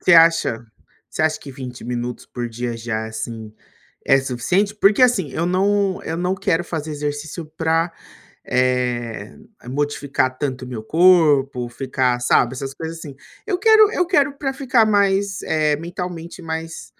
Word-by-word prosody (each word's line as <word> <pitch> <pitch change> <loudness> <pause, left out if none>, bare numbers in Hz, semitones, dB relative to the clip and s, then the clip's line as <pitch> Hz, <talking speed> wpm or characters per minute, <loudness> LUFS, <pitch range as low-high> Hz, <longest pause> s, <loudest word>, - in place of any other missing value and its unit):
Você 180 - +3
acha, 165 -8 +4 0.4
você - - -3
acha 155 0 +1
que 140 - -9
20 130 -2 -8
minutos 120 0 -4
por 120 -1 -5
dia 120 +1 -4
já 110 -1 -3
é - - -7
assim, 110 0 -6 0.5
é 135 - +5
suficiente? 175 - 0
Porque 210 +3 +3
assim 210 - +3
eu 170 - -1
não 195 +1 +1
eu 160 - -4
não 180 +2 0
quero 180 -3 0
fazer 160 -3 -4
exercício 150 +2 -4
para, 165 +1 +1 0.5
eh, 125 -3 -1 0.3
modificar 140 -2 -1
tanto 130 -3 -3
o 125 - -9
meu 115 -4 -6
corpo, 145 -5 +3
ficar 125 0 -1
sabe, 125 0 +2
essas 135 +1 -5
coisas 165 0 -6
assim. 145 -4 -9 0.3
Eu 380 -4 -1
quero 435 +1 +6
eu 360 -5 +1
quero 295 -6 +2
pra 270 -2 -2
ficar 260 -4 +2
mais, 200 -1 +1
eh, 155 -2 +1
mentalmente 170 +1 -6
mais 160 0 -5
155 Hz, 160 wpm, -21 LUFS, 125-185 Hz, 0.5 s, quero